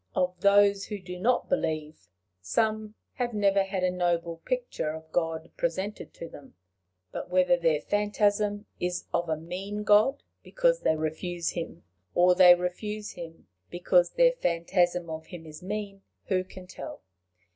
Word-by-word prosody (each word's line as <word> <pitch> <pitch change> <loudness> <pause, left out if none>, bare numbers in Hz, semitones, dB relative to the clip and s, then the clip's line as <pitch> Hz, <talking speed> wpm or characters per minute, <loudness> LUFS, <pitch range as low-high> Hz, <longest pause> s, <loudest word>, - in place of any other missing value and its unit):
Of 180 -1 0
those 200 0 +5
who 210 - -5
do 180 -1 -8
not 240 +6 +1
believe, 155 - -2 0.3
some 215 - -1 0.2
have 240 -3 -2
never 200 -1 +3
had 195 -1 -2
a 185 - +2
noble 170 -2 -1
picture 250 -10 -2
of 160 0 -12
God 165 -1 -2
presented 190 +5 -3
to 170 - -7
them; 140 - -14 0.6
but - - -6
whether 180 -1 +4
their 165 -3 +1
phantasm 205 +1 +1
is 180 0 -2
of 170 -1 0
a 155 - 0
mean 190 +6 -5
God 210 +6 +4 0.2
because - - +1
they 160 - +2
refuse 165 +2 -2
him, 165 - -6 0.3
or 180 +1 +6
they 180 -1 +8
refuse 210 +4 -4
him 165 -1 -10 0.2
because 175 0 +2
their - - +5
phantasm 175 - 0
of 160 0 -7
him 175 -3 -10
is 155 -1 -10
mean, 200 +1 -5 0.3
who 185 -2 +2
can 185 0 -12
tell? 180 - -9
180 Hz, 155 wpm, -28 LUFS, 170-205 Hz, 0.6 s, they